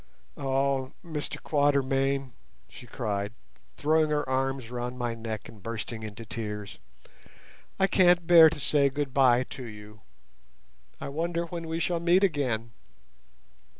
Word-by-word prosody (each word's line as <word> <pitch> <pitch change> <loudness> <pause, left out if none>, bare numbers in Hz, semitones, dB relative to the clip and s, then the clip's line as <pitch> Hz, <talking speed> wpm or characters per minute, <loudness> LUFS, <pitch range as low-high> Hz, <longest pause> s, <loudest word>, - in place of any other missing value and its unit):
"Oh, 135 -1 0
Mr 155 -3 -4
Quatermain," 135 -2 +1 0.4
she 125 - -13
cried, 105 -3 -3 0.4
throwing 155 +1 +2
her 150 -2 0
arms 130 -2 -1
round 125 0 -4
my 120 -2 -2
neck 110 -2 -6
and 105 - -14
bursting 115 +1 -5
into 110 +1 -8
tears, 105 -2 -6 1.0
"I 195 - +5
can't 175 -3 +4
bear 165 -2 +9
to 155 - -7
say 140 0 +3
goodbye 135 -3 +3
to 130 - -7
you. 105 -2 -11 1.0
I - - -5
wonder 170 +3 -2
when 170 -1 -6
we 160 +1 -2
shall 170 0 0
meet 175 +3 +3
again?" 125 - 0
135 Hz, 130 wpm, -28 LUFS, 115-155 Hz, 1.0 s, bear